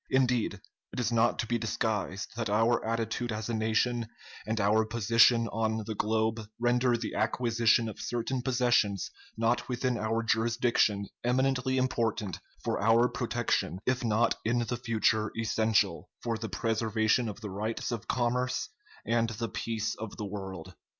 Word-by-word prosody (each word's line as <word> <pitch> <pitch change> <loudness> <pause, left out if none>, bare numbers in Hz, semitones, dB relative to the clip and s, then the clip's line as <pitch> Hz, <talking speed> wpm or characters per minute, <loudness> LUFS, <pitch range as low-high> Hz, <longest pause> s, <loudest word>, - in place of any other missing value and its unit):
Indeed, 125 -6 +1 0.3
it - - -5
is 120 -1 0
not 115 0 +3
to - - -1
be 120 +1 -1
disguised 105 -3 -2
that 115 -2 -2
our 115 +3 +2
attitude 115 +1 -2
as 110 +1 -4
a - - -1
nation 115 +1 +1 0.4
and 110 +1 -1
our 105 +2 +3
position 115 +1 +4
on 110 0 -1
the 110 - -3
globe 110 +1 0 0.2
render 120 0 +2
the 115 - -4
acquisition 115 0 +2
of 110 0 -7
certain 120 +3 -2
possessions 120 -6 +1 0.3
not 120 +2 +1
within 125 -1 -1
our 110 +2 0
jurisdiction 115 -2 +2 0.2
eminently 130 +1 +1
important 115 -6 -1 0.2
for - - -1
our 115 +3 +5
protection, 120 -6 -1
if 125 0 0
not 115 +1 +2
in 120 +2 +1
the 120 - -2
future 110 -2 +1
essential 110 -5 +1
for 115 -1 -1
the 110 0 -5
preservation 110 +1 +1
of 105 - -7
the 105 -3 -6
rights 110 +5 -3
of 115 -4 -4
commerce 125 +1 0 0.4
and 115 0 +1
the 115 +1 -4
peace 110 -2 -2
of 110 -2 -7
the 105 - -4
world." 95 -4 -7
115 Hz, 155 wpm, -30 LUFS, 110-120 Hz, 0.4 s, our